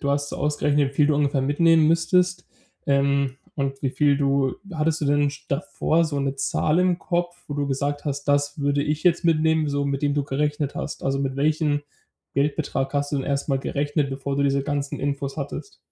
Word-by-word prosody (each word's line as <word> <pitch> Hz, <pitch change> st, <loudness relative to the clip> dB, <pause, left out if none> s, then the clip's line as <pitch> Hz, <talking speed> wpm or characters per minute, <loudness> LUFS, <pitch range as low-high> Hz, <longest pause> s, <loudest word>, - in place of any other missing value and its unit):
du 140 Hz, -, -1 dB
hast 145 Hz, 0 st, 0 dB
so -, -, -5 dB
ausgerechnet, 145 Hz, -1 st, +1 dB
wie -, -, -18 dB
viel 145 Hz, +1 st, +4 dB
du 150 Hz, -, +3 dB
ungefähr 140 Hz, -2 st, +1 dB
mitnehmen 160 Hz, +3 st, +4 dB
müsstest, 180 Hz, +2 st, +2 dB, 0.4 s
ähm, 140 Hz, -1 st, +2 dB, 0.2 s
und 135 Hz, -1 st, -2 dB
wie 135 Hz, -, +1 dB
viel 145 Hz, 0 st, +3 dB
du 140 Hz, -2 st, +1 dB, 0.2 s
hattest 160 Hz, -1 st, 0 dB
du -, -, -1 dB
denn 145 Hz, 0 st, +2 dB
sch 145 Hz, -, -12 dB
davor 165 Hz, +1 st, +1 dB
so 150 Hz, -3 st, -2 dB
'ne 140 Hz, -1 st, -1 dB
Zahl 150 Hz, +4 st, +1 dB
im 180 Hz, -1 st, +2 dB
Kopf, 175 Hz, -1 st, -2 dB
wo 145 Hz, -, -5 dB
du 145 Hz, -1 st, -1 dB
gesagt 145 Hz, +2 st, -2 dB
hast: 140 Hz, -1 st, -3 dB
„Das 145 Hz, +1 st, +1 dB
würde 145 Hz, 0 st, +1 dB
ich 150 Hz, +2 st, -2 dB
jetzt 175 Hz, -1 st, +3 dB
mitnehmen“, 160 Hz, -1 st, +3 dB
so 140 Hz, 0 st, -1 dB
mit 140 Hz, 0 st, -2 dB
dem 145 Hz, -, +2 dB
du 145 Hz, -1 st, 0 dB
gerechnet 145 Hz, +1 st, -1 dB
hast? -, -, -5 dB
Also, 135 Hz, 0 st, 0 dB
mit 135 Hz, -1 st, -2 dB
welchen 150 Hz, 0 st, +1 dB, 0.5 s
Geldbetrag 140 Hz, -1 st, 0 dB
hast 145 Hz, +1 st, -1 dB
du -, -, +1 dB
denn 135 Hz, -, -2 dB
erst 140 Hz, +1 st, -1 dB
mal 135 Hz, -2 st, +2 dB
gerechnet, 145 Hz, 0 st, -1 dB
bevor 135 Hz, +1 st, -3 dB
du 140 Hz, -, +2 dB
diese 140 Hz, 0 st, +2 dB
ganzen 145 Hz, 0 st, -3 dB
Infos 140 Hz, 0 st, -3 dB
hattest? 150 Hz, -, -6 dB
145 Hz, 210 wpm, -24 LUFS, 140-155 Hz, 0.5 s, viel